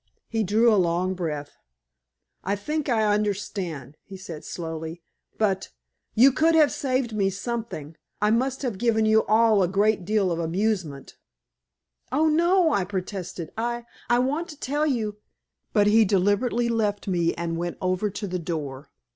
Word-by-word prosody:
He 225 -1 -1
drew 220 +4 +4
a 200 - +4
long 175 +2 0
breath. 150 -5 -5 0.9
"I 200 +2 0
think 300 +8 -3
I 225 -3 +2
understand," 195 - -2
he 195 - -10
said 165 -5 -8
slowly, 165 0 -6 0.3
"but 195 -3 0 0.5
you 260 +5 +7
could 320 +5 +3
have 305 -2 +5
saved 255 -4 -1
me 195 -2 +2
something. 200 - -5 0.2
I 210 +1 +2
must 260 +4 0
have 230 -7 -3
given 220 -2 +2
you 220 0 +4
all 220 -2 +4
a 180 - +3
great 200 +2 +2
deal 200 -1 +1
of 170 - -1
amusement." 170 -4 -2 0.9
"Oh, 305 +5 +3
no," 340 +1 +3
I 200 - +2
protested. 185 -3 -5
"I 235 +1 -2 0.2
I 240 - +4
want 290 +8 0
to 300 -3 -10
tell 295 +3 0
you 220 -7 -1 0.3
" - - -56
But 205 -2 +3
he 220 +2 +5
deliberately 205 +5 +1
left 210 -4 -1
me 170 -3 +1
and 170 0 -3
went 175 +1 -3
over 185 +3 0
to 205 +1 -5
the 180 -2 -3
door. 150 -5 -5
205 Hz, 165 wpm, -25 LUFS, 180-235 Hz, 0.9 s, you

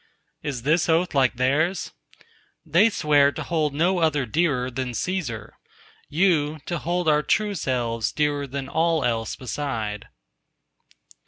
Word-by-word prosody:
"Is 135 -5 -4
this 160 +4 +2
oath 170 +2 +2
like 130 -4 +3
theirs?" 150 +8 0 0.7
They 170 +8 +4
swear 145 -7 +3
to - - -5
hold 155 -4 -1
no 175 +4 +2
other 150 -5 +1
dearer 130 -1 0
than 125 0 -3
Cæsar: 125 - -3 0.6
you, 155 -2 +2
to 175 -2 -3
hold 175 +1 -1
our 150 -1 +4
true 210 +6 +1
selves 120 - -1
dearer 145 -2 0
than 135 0 -5
all 160 0 +1
else 115 -2 -1
beside. 115 -5 -4
150 Hz, 135 wpm, -24 LUFS, 130-165 Hz, 0.7 s, They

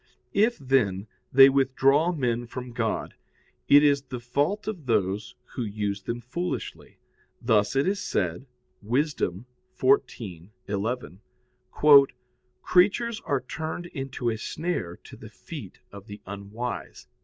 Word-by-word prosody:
If, 225 +4 +3
then, 115 -8 +1 0.3
they 135 +1 +9
withdraw 135 +4 +3
men 120 -7 -1
from 125 +1 -7
God, 115 -3 -2 0.5
it 145 +1 +7
is 140 -1 +4
the 130 -2 -7
fault 145 - -1
of 180 -11 -5
those 100 -2 0 0.2
who - - -4
use 105 -2 -3
them 120 +5 -4
foolishly. 170 +10 -5 0.4
Thus 110 -1 +2
it 135 +4 +2
is 200 +1 0
said 90 - -2 0.3
(Wis. 135 +8 0
14:11): 105 - -2 1.4
"Creatures 215 +5 +2
are 140 -2 0
turned 160 +6 -5
into 135 -6 -3
a 110 - -3
snare 155 - -3
to - - -12
the - - -12
feet - - -10
of 100 +1 -11
the 105 +1 -9
unwise." 100 0 -6
125 Hz, 120 wpm, -26 LUFS, 105-150 Hz, 1.4 s, they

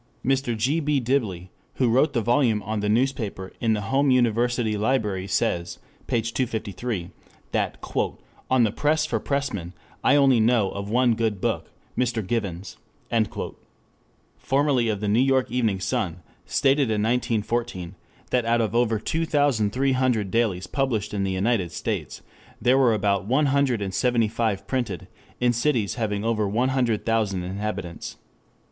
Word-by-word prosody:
Mr. 130 -3 +1
G. 135 +9 +1
B. 150 -2 +1
Diblee, 110 -9 -1 0.2
who 130 - +2
wrote 130 +7 +3
the 120 -4 0
volume 120 -3 +2
on 110 +1 -2
The 105 0 -1
Newspaper 110 -5 -1
in 115 -2 +2
the 105 - -1
Home 140 +1 +3
University 120 -2 +2
Library 105 -4 0
says 85 -2 -1 0.3
(p. 115 - +1
253), 110 -5 -3 0.4
that - - -1 0.7
"on 130 -2 +4
the 110 - +2
press 155 +5 +1
for - - -1
pressmen 135 - -2 0.3
I 145 - +5
only 135 -4 +5
know 110 -3 +3
of 100 0 -5
one 120 +1 +3
good 110 -3 -1
book, - - -2 0.3
Mr. 120 -4 0
Given's."] 95 -4 -3 1.6
formerly 135 -4 +2
of 105 -2 -2
the 105 - -1
New 105 +3 +3
York 130 -2 +2
Evening 115 -6 +1
Sun, 90 -3 -2 0.2
stated 135 -2 +2
in 105 -1 +1
1914 115 -5 -1 0.4
that 125 -1 +2
out 115 +1 +2
of 110 -1 0
over 115 -2 +2
two 165 +9 -2
thousand 140 -9 +2
three 135 +3 +1
hundred 125 -7 +1
dailies 105 -6 +1
published 120 -1 -1
in 100 -1 -1
the 95 - -1
United 95 -2 0
States, - - -4 0.4
there 125 +3 +3
were 120 -4 +4
about 100 -1 0
one 135 +6 +3
hundred 135 -6 +2
and 95 -1 -4
seventy 120 0 +2
five 105 -3 -1
printed 120 -9 -3 0.3
in 125 -1 +3
cities 120 -4 +1
having 105 -3 -2
over 110 -2 +1
one 120 +6 +1
hundred 125 -5 0
thousand 105 -5 0
inhabitants. 95 -2 -5
115 Hz, 155 wpm, -24 LUFS, 105-130 Hz, 1.6 s, I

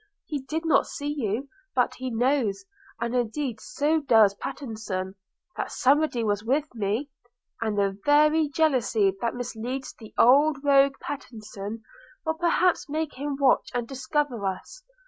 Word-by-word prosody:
He 290 -3 -4
did 315 +5 -4
not 320 - +3
see 290 +1 -4
you; 240 0 -2 0.3
but 250 - +2
he 260 0 -5
knows, 245 - 0 0.3
and 235 +1 -2
indeed 245 +1 -1
so 295 +9 0
does 225 -8 +5
Pattenson, 215 -7 -5 0.4
that - - -3
somebody 275 -2 +2
was 205 -1 0
with 285 +5 0
me; 225 +6 -2 0.5
and 220 -2 -1
the 200 -1 0
very 300 +1 +4
jealousy 250 -10 +2
that 235 0 -1
misleads 245 +2 -5
the 220 -2 -13
old 285 +5 +5
rogue 275 -1 +5
Pattenson, 220 -5 -7 0.4
will 320 - +1
perhaps 345 0 +1
make 310 0 -2
him 285 +2 -3
watch 270 -2 +3
and 240 -1 -1
discover 270 -3 -2
us. 190 - -6
255 Hz, 145 wpm, -26 LUFS, 220-290 Hz, 0.5 s, does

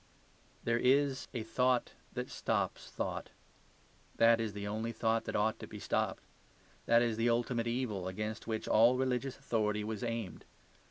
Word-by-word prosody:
There 115 0 +1
is 135 +1 +3
a 120 -3 -3
thought 125 +2 +1 0.2
that - - -4
stops - - -1
thought. - - -4 0.9
That 115 0 +6
is 110 -2 -2
the 100 0 -5
only 110 +3 -2
thought 115 0 0
that - - -4
ought 110 +1 +1
to - - -7
be - - -8
stopped. - - -1 0.6
That 115 0 +6
is 115 -2 0
the 115 +1 +2
ultimate 120 0 +1
evil 115 -6 -2
against 105 +4 -4
which 110 -1 -2
all 120 +3 +5
religious 130 0 -1
authority 105 -5 0
was 110 0 -4
aimed. 115 -5 -3
115 Hz, 160 wpm, -33 LUFS, 110-120 Hz, 0.9 s, That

